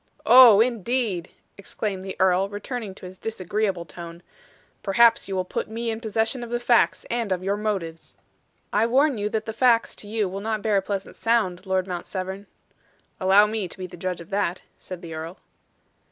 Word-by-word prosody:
"Oh, 240 Hz, -5 st, +9 dB
indeed!" 230 Hz, -5 st, 0 dB, 0.3 s
exclaimed 200 Hz, -1 st, -4 dB
the 190 Hz, 0 st, -6 dB
earl, 190 Hz, +1 st, +3 dB
returning 205 Hz, 0 st, -6 dB
to -, -, -11 dB
his 185 Hz, +1 st, -11 dB
disagreeable 195 Hz, -3 st, -2 dB
tone. 170 Hz, +2 st, -10 dB, 0.6 s
"Perhaps 230 Hz, +3 st, +4 dB
you 195 Hz, -, -3 dB
will 185 Hz, -1 st, -1 dB
put -, -, -4 dB
me 230 Hz, +1 st, -3 dB
in 220 Hz, 0 st, -5 dB
possession 225 Hz, +2 st, -1 dB
of 235 Hz, -, -7 dB
the 240 Hz, 0 st, -1 dB
facts, 240 Hz, -1 st, +2 dB
and 235 Hz, -4 st, -1 dB
of 185 Hz, 0 st, -1 dB
your 195 Hz, +1 st, 0 dB
motives." 195 Hz, -6 st, -4 dB, 0.6 s
"I 220 Hz, +2 st, +3 dB
warn 270 Hz, 0 st, +2 dB
you 205 Hz, +1 st, -1 dB
that 215 Hz, 0 st, -2 dB
the 220 Hz, -, -5 dB
facts 235 Hz, 0 st, +3 dB
to 205 Hz, -, -6 dB
you 215 Hz, -1 st, -1 dB
will 195 Hz, +2 st, -5 dB
not 215 Hz, -1 st, -2 dB
bear 215 Hz, -2 st, +2 dB
a -, -, +2 dB
pleasant 195 Hz, 0 st, -5 dB
sound, 205 Hz, -5 st, 0 dB
Lord 190 Hz, -1 st, +1 dB
Mount 180 Hz, -2 st, -5 dB
Severn." 190 Hz, +1 st, -5 dB, 0.7 s
"Allow 195 Hz, +2 st, +6 dB
me 210 Hz, -2 st, -2 dB
to 175 Hz, -, -11 dB
be 185 Hz, -, -5 dB
the 180 Hz, -, -10 dB
judge 180 Hz, 0 st, -4 dB
of 170 Hz, -, -13 dB
that," 195 Hz, -3 st, -1 dB
said 180 Hz, -2 st, -9 dB
the 165 Hz, -1 st, -7 dB
earl. 160 Hz, +3 st, -6 dB
200 Hz, 195 wpm, -24 LUFS, 185-225 Hz, 0.7 s, Oh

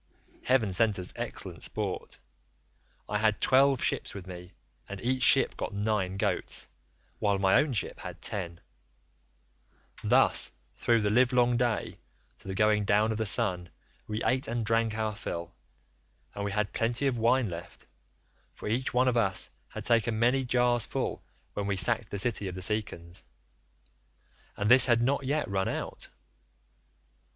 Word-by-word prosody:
Heaven 115 Hz, -7 st, +2 dB
sent 110 Hz, +1 st, +3 dB
us 90 Hz, -1 st, -4 dB
excellent -, -, -4 dB
sport; -, -, -2 dB, 0.9 s
I 105 Hz, -, -1 dB
had 110 Hz, -1 st, +2 dB
twelve 135 Hz, 0 st, +4 dB
ships -, -, -2 dB
with 95 Hz, -3 st, -7 dB
me, 90 Hz, 0 st, -10 dB, 0.4 s
and 100 Hz, 0 st, -6 dB
each 130 Hz, +3 st, -1 dB
ship -, -, +4 dB
got -, -, -5 dB
nine 100 Hz, -2 st, -1 dB
goats, -, -, -2 dB, 0.5 s
while 100 Hz, -2 st, +1 dB
my 95 Hz, 0 st, +2 dB
own 145 Hz, -3 st, -2 dB
ship 110 Hz, -, -3 dB
had -, -, -8 dB
ten; 85 Hz, -4 st, -4 dB, 1.4 s
thus -, -, +4 dB, 0.2 s
through 115 Hz, -1 st, +2 dB
the 105 Hz, 0 st, +1 dB
livelong 125 Hz, +1 st, +3 dB
day 120 Hz, -2 st, -1 dB, 0.4 s
to -, -, -12 dB
the 95 Hz, -, -4 dB
going 105 Hz, 0 st, +3 dB
down 105 Hz, +2 st, +2 dB
of 110 Hz, -, -3 dB
the 110 Hz, -, 0 dB
sun 90 Hz, -5 st, +2 dB, 0.4 s
we 110 Hz, +1 st, -3 dB
ate 130 Hz, 0 st, +1 dB
and 115 Hz, -1 st, -2 dB
drank 115 Hz, 0 st, +1 dB
our 110 Hz, -1 st, -2 dB
fill, 85 Hz, -3 st, -6 dB, 0.8 s
and 100 Hz, -, -5 dB
we 100 Hz, -, -2 dB
had 105 Hz, 0 st, -1 dB
plenty 120 Hz, +4 st, 0 dB
of 130 Hz, -4 st, 0 dB
wine 120 Hz, +2 st, +3 dB
left, 85 Hz, +1 st, -9 dB, 0.7 s
for -, -, -8 dB
each 125 Hz, +4 st, -1 dB
one 130 Hz, +1 st, +3 dB
of 125 Hz, -, +2 dB
us 95 Hz, -5 st, +1 dB, 0.2 s
had -, -, -8 dB
taken 115 Hz, -1 st, +2 dB
many 125 Hz, +4 st, +2 dB
jars 125 Hz, -2 st, +2 dB
full -, -, -3 dB, 0.3 s
when 100 Hz, -1 st, -3 dB
we 100 Hz, -, 0 dB
sacked 110 Hz, +4 st, +1 dB
the 100 Hz, -, -4 dB
city 105 Hz, -1 st, -1 dB
of 90 Hz, -, -5 dB
the 95 Hz, -, -3 dB
Cicons, 95 Hz, -4 st, -3 dB, 1.3 s
and 100 Hz, +1 st, -1 dB
this 130 Hz, +1 st, +7 dB
had 120 Hz, -2 st, +4 dB
not 135 Hz, +3 st, 0 dB
yet 150 Hz, +2 st, 0 dB
run 95 Hz, -1 st, -1 dB
out. -, -, -5 dB
110 Hz, 160 wpm, -29 LUFS, 100-120 Hz, 1.4 s, this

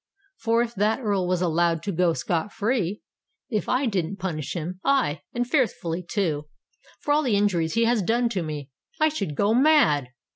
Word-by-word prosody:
For 230 Hz, 0 st, +2 dB
if 235 Hz, 0 st, -5 dB
that 210 Hz, +3 st, +1 dB
Earl 200 Hz, -7 st, 0 dB
was 180 Hz, 0 st, 0 dB
allowed 170 Hz, -1 st, +1 dB
to 205 Hz, -, -2 dB
go 175 Hz, -1 st, +2 dB
scot 170 Hz, +4 st, -2 dB
free—if 210 Hz, 0 st, -3 dB
I 255 Hz, +2 st, +2 dB
didn't 195 Hz, -4 st, -1 dB
punish 165 Hz, -7 st, -4 dB
him—aye, 180 Hz, -, 0 dB
and 245 Hz, 0 st, -1 dB
fearfully 220 Hz, -, 0 dB
too—for 165 Hz, -, -4 dB
all 300 Hz, -, +3 dB
the 250 Hz, -8 st, +1 dB
injuries 180 Hz, -5 st, +1 dB
he 230 Hz, 0 st, +3 dB
has 235 Hz, -2 st, +2 dB
done 235 Hz, +5 st, +1 dB
to 200 Hz, -6 st, -2 dB
me, 150 Hz, -3 st, -6 dB, 0.3 s
I 310 Hz, 0 st, +4 dB
should 200 Hz, -, -4 dB
go 205 Hz, +7 st, +2 dB
mad! 235 Hz, -, +4 dB
195 Hz, 170 wpm, -25 LUFS, 165-235 Hz, 0.3 s, I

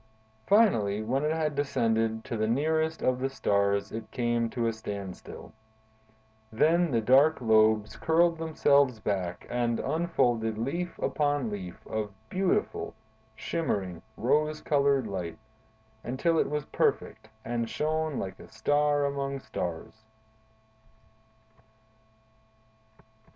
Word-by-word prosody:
Finally, 110 Hz, -, +3 dB
when 130 Hz, +6 st, 0 dB
it 150 Hz, -, +1 dB
had 160 Hz, -1 st, 0 dB
descended 115 Hz, -5 st, 0 dB
to -, -, -4 dB
the 110 Hz, 0 st, 0 dB
nearest 160 Hz, +6 st, 0 dB
of 130 Hz, 0 st, +2 dB
the 135 Hz, +1 st, -1 dB
stars, 100 Hz, -6 st, 0 dB
it 110 Hz, 0 st, -6 dB
came 120 Hz, -2 st, 0 dB
to 120 Hz, 0 st, -2 dB
a 115 Hz, -, +1 dB
standstill. 100 Hz, -4 st, -8 dB, 1.0 s
Then 165 Hz, +9 st, +3 dB
the 115 Hz, -5 st, +1 dB
dark 135 Hz, +7 st, +5 dB
lobes 110 Hz, -2 st, +3 dB
curled 165 Hz, 0 st, +2 dB
themselves 140 Hz, -6 st, +3 dB
back 95 Hz, -4 st, -3 dB
and 120 Hz, -1 st, 0 dB
unfolded 120 Hz, -8 st, 0 dB
leaf 170 Hz, +10 st, -3 dB
upon 145 Hz, -6 st, 0 dB
leaf 95 Hz, -4 st, -7 dB
of 110 Hz, -2 st, -3 dB, 0.2 s
beautiful, 185 Hz, -, -1 dB, 0.4 s
shimmering, 95 Hz, -, -2 dB, 0.2 s
rose 150 Hz, +5 st, +1 dB
colored 140 Hz, -4 st, +2 dB
light, 90 Hz, -5 st, -4 dB, 0.7 s
until 160 Hz, +7 st, +1 dB
it -, -, +1 dB
was 150 Hz, -1 st, -2 dB
perfect, 110 Hz, -, -1 dB, 0.2 s
and 115 Hz, -1 st, -2 dB
shone 155 Hz, -1 st, -1 dB
like 95 Hz, -1 st, -5 dB
a -, -, -12 dB
star 145 Hz, +5 st, +1 dB
among 140 Hz, -1 st, -2 dB
stars. 90 Hz, -1 st, -6 dB
125 Hz, 115 wpm, -28 LUFS, 110-150 Hz, 1.0 s, dark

